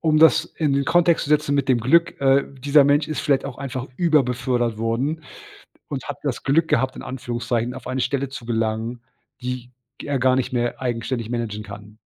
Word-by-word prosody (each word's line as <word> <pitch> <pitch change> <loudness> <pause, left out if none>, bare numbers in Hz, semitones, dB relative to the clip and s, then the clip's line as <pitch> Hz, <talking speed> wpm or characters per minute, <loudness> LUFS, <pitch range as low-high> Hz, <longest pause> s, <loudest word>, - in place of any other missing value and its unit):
um 155 -2 +3
das 160 -4 +6
in 150 -3 -2
den 140 0 +1
Kontext 170 0 +3
zu 145 - -6
setzen 150 -1 +2
mit 140 -1 0
dem 125 -2 +4
Glück, 165 +9 +2
äh, 135 0 +4
dieser 140 +2 +5
Mensch 145 +2 +3
ist 155 - -2
vielleicht 140 -2 +1
auch 140 -3 -6
einfach 130 -1 -4
über-befördert 125 -7 +1
worden 130 +8 -1 0.7
und - - -5
hat - - -5
das - - -3
Glück 150 +5 +2
gehabt, 130 0 +1
in - - -8
Anführungszeichen, 120 -1 -3
auf 130 -1 -9
eine 130 0 -2
Stelle 140 +1 -1
zu 125 -3 -8
gelangen, 115 +1 -2 0.4
die 125 0 -5 0.3
g - - -9
er 140 -2 0
gar 130 +1 +3
nicht 130 0 -1
mehr 120 -1 -1
eigenständig 120 -1 -2
managen 115 -3 -3
kann. 105 +1 -11
130 Hz, 200 wpm, -22 LUFS, 120-140 Hz, 0.7 s, das